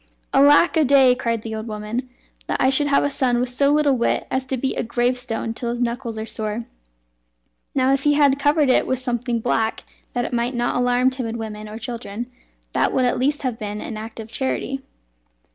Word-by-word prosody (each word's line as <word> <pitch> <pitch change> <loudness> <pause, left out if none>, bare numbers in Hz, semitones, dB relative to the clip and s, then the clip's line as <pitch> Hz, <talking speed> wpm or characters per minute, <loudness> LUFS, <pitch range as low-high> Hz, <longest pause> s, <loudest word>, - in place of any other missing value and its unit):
"Alack 290 +5 +5
a 315 - +5
day!" 265 -2 +6
cried 230 -3 -2
the 225 - -5
old 220 +1 -5
woman, 215 +4 -4 0.4
"that - - -1
I 260 - +4
should 290 +2 +2
have 280 - +3
a 285 - +1
son 250 -3 +1
with 250 0 +1
so 280 +3 +2
little 290 -2 +3
wit 235 - 0
as 260 0 0
to 260 0 -2
beat 265 +2 -2
a - - 0
gravestone 240 -1 -1
till 235 +1 -4
his 240 0 -3
knuckles 235 -1 -2
are 220 - -4
sore! 220 +1 -3 1.1
Now 265 0 +3
if 275 - +1
he 290 +1 +3
had 280 -2 +4
covered 290 0 +3
it - - +3
with 260 - 0
something 245 -1 -2
black 225 -1 0 0.3
that 245 -1 -1
it - - -5
might 240 +2 0
not 240 0 0
alarm 245 +1 +2
timid 235 -3 -4
women 215 -1 -6
or 215 - -7
children, 235 0 -6 0.4
that - - +2
would 255 - +2
at 245 - +1
least 285 +3 0
have 250 -4 -2
been 210 0 -4
an 225 - -6
act 220 +2 -8
of 220 0 -8
charity." 270 +1 -2
245 Hz, 210 wpm, -22 LUFS, 230-265 Hz, 1.1 s, day